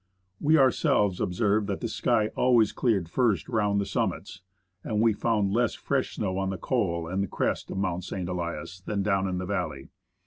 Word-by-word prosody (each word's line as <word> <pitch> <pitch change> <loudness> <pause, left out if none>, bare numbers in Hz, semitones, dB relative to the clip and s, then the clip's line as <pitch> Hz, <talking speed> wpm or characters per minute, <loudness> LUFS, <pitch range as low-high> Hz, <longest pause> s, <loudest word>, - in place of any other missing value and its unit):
We 155 +2 +4
ourselves 105 -8 +3
observed 100 +3 +1
that 100 - -2
the 115 - -2
sky 110 -1 +1
always 120 -4 +4
cleared 105 -9 0
first 105 -3 +1
round 105 -3 +1
the 100 - -1
summits, 95 - -3 0.4
and 105 -2 -1
we 115 0 +4
found 105 -2 0
less 120 0 +1
fresh 140 -2 -2
snow 95 -3 -2
on 95 0 -1
the 95 - -3
col 85 -1 -1
and 95 +2 -2
crest - - -2
of - - -5
Mount 95 -2 -1
St. 90 -1 -4
Elias 90 +1 -4
than 100 +2 -2
down 95 -1 +1
in 90 -1 -2
the 90 - -3
valley. 65 -6 -3
100 Hz, 185 wpm, -27 LUFS, 95-110 Hz, 0.4 s, We